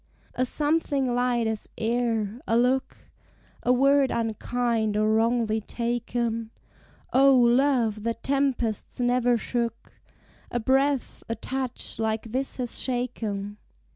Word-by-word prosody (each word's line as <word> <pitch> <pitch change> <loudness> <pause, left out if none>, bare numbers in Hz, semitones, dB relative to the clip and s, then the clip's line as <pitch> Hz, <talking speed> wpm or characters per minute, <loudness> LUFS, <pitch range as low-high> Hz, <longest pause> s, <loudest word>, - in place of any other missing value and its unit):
A 255 - 0
something 290 -3 +1
light 245 -1 +1
as 220 -1 -3
air, 230 -1 -1
a 230 - +3
look, 255 +2 +1 0.6
A 245 - +2
word 275 +1 +4
unkind 225 -1 -1
or 215 +1 +2
wrongly 225 -1 +1
taken, 235 0 -2 0.6
O, 270 0 +6
love 240 -3 +3
that 230 +1 -3
tempests 270 -6 -1
never 245 0 +2
shook, 235 0 -3 0.6
A 240 - -1
breath, 270 +3 +1
a 230 - -1
touch 255 0 -3
like 220 0 -2
this 265 +3 -2
has 245 -2 -3
shaken! 215 -5 -3
240 Hz, 115 wpm, -26 LUFS, 225-255 Hz, 0.6 s, O